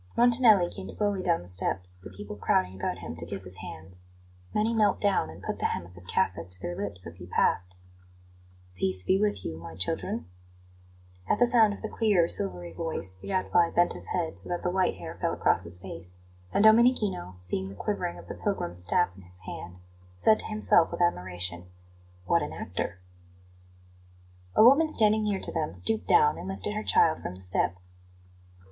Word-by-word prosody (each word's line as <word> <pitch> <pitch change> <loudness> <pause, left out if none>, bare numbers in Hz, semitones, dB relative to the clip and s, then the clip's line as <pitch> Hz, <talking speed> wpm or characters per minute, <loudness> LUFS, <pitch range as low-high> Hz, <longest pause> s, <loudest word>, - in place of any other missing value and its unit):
Montanelli 235 -6 +6
came 95 - -8
slowly 205 - 0
down 170 - +1
the - - -14
steps, 90 0 -1
the - - -9
people 100 +2 -9
crowding 95 -2 +1
about 90 -1 -3
him 85 -2 -7
to 85 - -3
kiss 95 +1 -4
his 90 0 -7
hands. 90 +3 -10 0.5
Many 215 +2 +1
knelt 210 -3 +2
down 195 - +1
and 80 - -12
put - - -4
the - - -2
hem 85 - -4
of 90 - -15
his 90 0 -12
cassock 90 -2 -1
to 90 0 -7
their 90 -1 -5
lips 100 -2 -5
as 85 +1 -8
he 90 - -9
passed. 90 0 0 1.0
"Peace 95 0 +2
be 190 - +2
with 210 -1 0
you, 80 - -4
my 85 -1 -9
children!" 90 -3 -2 1.0
At - - +3
the 245 - +5
sound 225 -4 +4
of - - -14
the - - -1
clear, 210 -6 +2
silvery 90 - 0
voice, 160 - -3
the 95 - -10
Gadfly 180 -3 +2
bent 175 - +3
his - - -9
head, 170 -3 -2
so - - -2
that 175 0 -3
the 180 - 0
white 185 0 +1
hair - - -9
fell - - 0
across - - +1
his 85 +1 -3
face; 90 -1 -10 0.4
and 200 - +2
Domenichino, 220 - +4
seeing 90 +1 -2
the 100 - -10
quivering 100 - -3
of 85 - -12
the - - -5
pilgrim's 90 +1 -2
staff 175 - +2
in 95 - -14
his 90 0 -13
hand, 90 -1 -8 0.4
said 215 - +4
to - - -3
himself 215 -6 +3
with 170 - -4
admiration: 90 - -2 0.6
"What - - +2
an - - -4
actor!" 90 +2 -5 1.6
A - - +7
woman 285 +7 +6
standing 215 -5 +3
near 205 -2 0
to - - -4
them 160 -2 -2
stooped 220 -1 0
down 445 +1 +4
and - - -7
lifted 195 +2 -4
her 215 - -2
child 165 -6 +3
from 90 - -6
the 95 - -11
step. 90 -1 +1
100 Hz, 195 wpm, -28 LUFS, -, 1.6 s, A